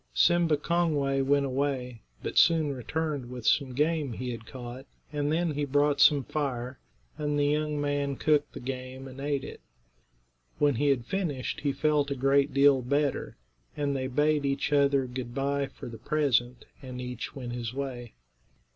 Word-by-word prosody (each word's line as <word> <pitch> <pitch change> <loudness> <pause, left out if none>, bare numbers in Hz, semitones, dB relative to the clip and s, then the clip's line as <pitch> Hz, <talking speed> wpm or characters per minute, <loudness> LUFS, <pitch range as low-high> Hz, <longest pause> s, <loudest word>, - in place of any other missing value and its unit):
Simba 165 - +4
Kongway 150 -4 +1
went 140 +1 +2
away, 130 -3 -2 0.2
but - - -4
soon 160 -4 +4
returned 145 0 -3
with 125 -2 -7
some 135 0 +2
game 150 -2 +1
he 125 +2 -4
had 115 -2 -8
caught, 130 +1 -8 0.3
and 145 0 0
then 170 +1 +1
he 145 0 -2
brought 145 +1 +2
some 145 -3 +6
fire, 130 -3 -3 0.4
and 150 -1 0
the 145 - +2
young 150 0 0
man 145 -1 -1
cooked 150 +1 +1
the - - -7
game 130 +1 -6
and 130 0 -10
ate 140 -1 -1
it. - - -9 1.0
When 145 -1 +3
he 140 +5 0
had 130 -4 +2
finished 150 -7 -2
he 145 - 0
felt 145 +1 +1
a 140 - -1
great 135 +1 +3
deal 140 -1 +5
better, 140 +3 -1 0.4
and 145 -1 0
they 130 -1 -1
bade 150 +3 +2
each 140 +1 0
other 140 -2 +3
good 125 -1 -6
bye 140 0 0
for - - -10
the 115 -2 -9
present, 125 -4 0 0.2
and 125 -2 -7
each 125 -1 -6
went 125 -3 -5
his 120 -2 -4
way. 125 -3 -5
140 Hz, 175 wpm, -28 LUFS, 130-145 Hz, 1.0 s, some